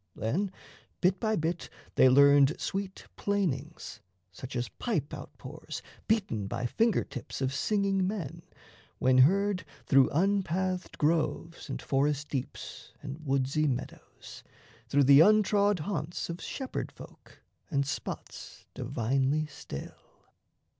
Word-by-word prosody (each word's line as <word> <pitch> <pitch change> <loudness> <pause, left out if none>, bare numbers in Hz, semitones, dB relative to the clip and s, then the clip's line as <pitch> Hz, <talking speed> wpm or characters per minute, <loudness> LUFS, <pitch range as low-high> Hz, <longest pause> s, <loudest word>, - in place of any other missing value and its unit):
Then 180 - -1 0.5
bit 180 +1 +2
by 220 -1 +1
bit 165 +1 -2 0.2
They 130 - +6
learned 140 +2 +6
sweet 195 -1 -4
plainings, 160 - -2 0.3
such 130 0 -8
as 120 -1 -1
pipe 95 - -3
out - - -7
pours, - - -8 0.2
Beaten 190 - 0
by 120 - -3
finger 225 - +2
tips 130 -4 -7
of 135 0 -1
singing 195 +3 +1
men, 170 -5 -4 0.6
When 130 0 +4
heard 195 +7 +4 0.2
through 135 -2 +5
unpathed 185 +1 0
groves 165 +2 0
and - - -3
forest 145 +1 0
deeps 130 -3 -6
And 145 +2 -7
woodsy 140 +2 +1
meadows, 130 -1 -6 0.5
through 145 0 +4
the 140 +1 +8
untrod 205 +2 +5
haunts 170 -1 -3
Of 170 - -7
shepherd 265 -2 -4
folk - - -15 0.3
and 140 -4 +1
spots 140 - -6
divinely 135 +6 0
still. 145 - -10
155 Hz, 120 wpm, -30 LUFS, 135-190 Hz, 0.6 s, the